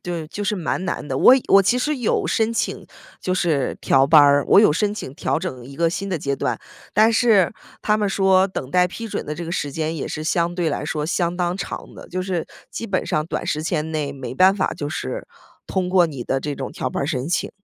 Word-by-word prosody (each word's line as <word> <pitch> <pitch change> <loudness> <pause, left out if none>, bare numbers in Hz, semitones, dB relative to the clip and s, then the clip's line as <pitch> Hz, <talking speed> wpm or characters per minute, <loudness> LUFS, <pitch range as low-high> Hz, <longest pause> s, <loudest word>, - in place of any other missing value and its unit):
对， 170 -3 -4
就 205 +6 -6
是 205 +1 -1
蛮 180 +1 -2
难 165 -5 -3
的。 130 - -3
我 195 - +7
我 195 0 +6
其 245 +6 +2
实 300 +4 0
有 245 -4 0
申 225 0 +1
请 230 - -2 0.4
就 185 - -2
是 160 -8 0
调 135 0 +4
班 150 +2 +7
儿， 145 0 +5
我 - - +7
有 210 -7 +6
申 205 +6 0
请 135 -10 -7
调 165 - -1
整 130 -10 -6
一 135 +2 -11
个 170 0 +2
新 195 +4 -4
的 175 -4 -2
阶 140 -1 -1
段， - - -2 0.3
但 220 +3 +4
是 220 -6 +4 0.3
他 210 - +2
们 210 -1 0
说 190 -1 +3
等 135 -8 -6
待 180 0 +4
批 230 +5 -7
准 - - -4
的 150 - -5
这 170 - -5
个 165 - -5
时 145 - -2
间 160 +3 -2
也 150 - -4
是 155 0 -5
相 170 +1 +1
对 175 -2 -1
来 145 - -3
说 150 -1 -2
相 175 0 -1
当 175 0 -1
长 - - -6
的， - - -12
就 185 - -3
是 185 -3 -2 0.3
基 230 - -5
本 190 -2 -1
上 155 0 0
短 - - -4
时 155 - -1
间 160 -1 -1
内 150 -2 -2
没 135 -2 -7
办 185 +6 +5
法 190 - 0
就 145 - -4
是 - - -4 0.4
通 185 -2 -2
过 180 -2 +4
你 135 -6 -7
的 135 - -1
这 145 0 -4
种 135 - -5
调 130 - -3
班 - - -2
儿 - - -3
申 135 -2 -2
请。 175 - -1
175 Hz, 270 characters per minute, -21 LUFS, 150-195 Hz, 0.4 s, 我